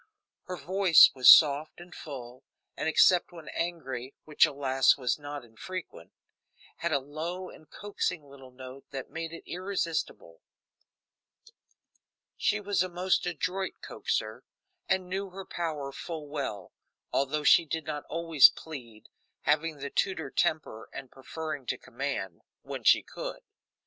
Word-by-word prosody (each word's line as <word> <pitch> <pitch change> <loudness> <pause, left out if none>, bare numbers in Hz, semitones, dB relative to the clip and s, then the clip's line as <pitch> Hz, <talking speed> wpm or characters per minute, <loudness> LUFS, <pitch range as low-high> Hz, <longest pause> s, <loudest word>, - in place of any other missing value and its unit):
Her 180 0 -5
voice 180 +2 +6
was 130 -2 +6
soft 150 +1 +7
and 175 0 -12
full, 130 -4 -9 0.3
and, - - -1
except 175 +2 +4
when 165 -3 -11
angry, 135 -7 -4
which, 155 +1 +4
alas, 135 -2 +2
was 125 0 -1
not 145 -2 -7
infrequent, 120 - -8 0.7
had 170 - -2
a 145 - +3
low 160 +7 -6
and 155 - -17
coaxing 185 -5 -3
little 135 -2 -14
note 130 +1 -11
that 135 -2 -7
made 165 0 -5
it 165 - -9
irresistible; 170 - -4 1.9
she 210 - +1
was 205 -3 0
a 185 - 0
most 180 +1 0
adroit 180 +3 -3
coaxer, 110 +3 -3 0.5
and 190 -1 +1
knew 195 +2 -3
her 190 +1 -9
power 155 -6 -4
full 155 +1 -7
well, 135 - -5 0.4
although 145 +2 0
she 170 - +6
did 160 0 -4
not 150 -2 -4
always 165 -4 +6
plead, 120 -9 -10 0.3
having 155 +1 +1
the 140 0 -6
Tudor 160 -8 -1
temper 155 -8 -1
and 130 - -9
preferring 145 0 -6
to - - -1
command 120 -9 -5 0.2
when - - -7
she - - +5
could. - - -7
155 Hz, 140 wpm, -29 LUFS, 135-175 Hz, 1.9 s, soft